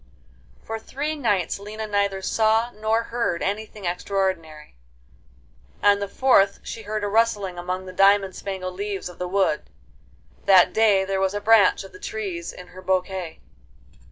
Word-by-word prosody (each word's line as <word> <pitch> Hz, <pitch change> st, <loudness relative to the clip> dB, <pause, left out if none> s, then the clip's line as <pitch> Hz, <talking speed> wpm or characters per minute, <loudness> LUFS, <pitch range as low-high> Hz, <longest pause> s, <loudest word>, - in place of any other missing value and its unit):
For 225 Hz, 0 st, -5 dB
three 290 Hz, +7 st, -4 dB
nights 205 Hz, -, 0 dB
Lina 215 Hz, +2 st, -6 dB
neither 200 Hz, -2 st, -1 dB
saw 225 Hz, +3 st, +2 dB
nor 220 Hz, +1 st, 0 dB
heard 230 Hz, -8 st, -1 dB
anything 210 Hz, 0 st, -4 dB
extraordinary; 175 Hz, -4 st, -2 dB, 1.1 s
on 205 Hz, 0 st, +5 dB
the 200 Hz, -, -3 dB
fourth 200 Hz, -3 st, +3 dB
she 225 Hz, -, -7 dB
heard 215 Hz, 0 st, -4 dB
a -, -, 0 dB
rustling 205 Hz, -4 st, +1 dB
among 185 Hz, +1 st, -4 dB
the 185 Hz, -, -9 dB
diamond 195 Hz, 0 st, +4 dB
spangled 190 Hz, -2 st, -5 dB
leaves 200 Hz, -1 st, -4 dB
of 180 Hz, -, -14 dB
the 180 Hz, -, -2 dB
wood. 185 Hz, -4 st, 0 dB, 0.8 s
That 185 Hz, -2 st, +6 dB
day 205 Hz, -3 st, +4 dB
there 195 Hz, 0 st, -1 dB
was 190 Hz, +1 st, 0 dB
a -, -, 0 dB
branch 220 Hz, -1 st, +4 dB
of 195 Hz, -, -12 dB
the -, -, -13 dB
trees 195 Hz, -6 st, -5 dB
in 180 Hz, 0 st, -12 dB
her 185 Hz, -, -12 dB
bouquet. 185 Hz, -2 st, -2 dB
200 Hz, 155 wpm, -24 LUFS, 185-215 Hz, 1.1 s, That